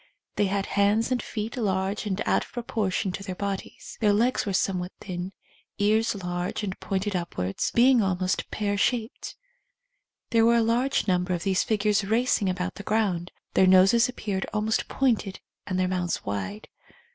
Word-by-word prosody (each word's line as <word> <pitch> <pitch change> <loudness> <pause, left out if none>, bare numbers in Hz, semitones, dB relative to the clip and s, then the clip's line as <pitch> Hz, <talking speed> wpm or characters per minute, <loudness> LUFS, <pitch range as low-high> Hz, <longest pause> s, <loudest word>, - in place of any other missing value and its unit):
They 205 - +2
had 195 +1 -1
hands 205 +4 +2
and 250 - +1
feet 215 +3 -5
large 195 -1 -1
and 195 -1 -2
out - - +2
of - - -15 0.2
pro]3ortion 190 -3 -1
to - - -5
their 185 -2 -5
bodies. 200 0 -5
Their 210 -2 +4
legs 235 +2 +1
were 195 - -1
somewhat 185 -1 0
thin, 180 -1 -5 0.5
ears 215 +2 +2
large 180 +1 -3
and 195 -2 -2
pointed 195 +1 -2
upwards, 100 - -2
being 245 0 +6
almost 185 -2 -1
pear 205 -1 -1
shaped. 230 +2 -1 1.0
There 230 -2 +4
were 235 +1 +5
a 230 - +3
large 240 +4 +1
number 180 -1 +1
of 170 - -5
these 190 -1 +2
figures 210 -1 +1
racing 220 -1 +1
about 185 +1 -2
the - - -8
ground. 200 -5 0 0.2
Their 190 - +5
noses 190 +6 +6
ap 250 - -7
peared 195 -3 -3
almost 215 +1 0
pointed 225 -7 0 0.3
and 185 - -1
their 185 - +2
mouths 180 -1 -2
wide. 100 - -4
200 Hz, 170 wpm, -26 LUFS, 185-220 Hz, 1.0 s, being